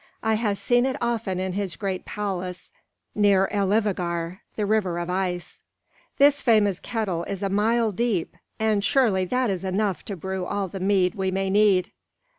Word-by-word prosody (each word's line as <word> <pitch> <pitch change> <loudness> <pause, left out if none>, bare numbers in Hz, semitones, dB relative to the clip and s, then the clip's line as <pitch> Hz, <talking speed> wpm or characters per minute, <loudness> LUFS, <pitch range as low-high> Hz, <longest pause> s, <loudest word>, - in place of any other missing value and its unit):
"I 220 -1 +2
have 215 -2 0
seen 245 +4 +2
it 260 - -1
often 225 -6 -1
in 185 0 -2
his 195 -2 -3
great 195 -3 -3
palace 185 -3 -4 0.4
near 200 -2 +4
Elivâgar, 185 -4 0 0.2
the 210 - -1
river 200 -5 +1
of 175 +1 -3
ice. 180 -1 -3 0.6
This 285 0 +5
famous 205 -6 +3
kettle 200 -8 -2
is 200 0 -5
a 195 - 0
mile 220 +3 +2
deep, 205 -4 -1 0.2
and 215 -2 +1
surely 215 -7 +2
that 250 +3 0
is 190 -1 -3
large 190 -1 -2
enough 205 -3 0
to 200 - -4
brew 190 +1 -4
all 200 +1 -2
the 190 +2 -7
mead 190 -1 +2
we 190 -3 -1
may 190 0 -1
need." 200 -3 +3
200 Hz, 175 wpm, -24 LUFS, 185-215 Hz, 0.6 s, This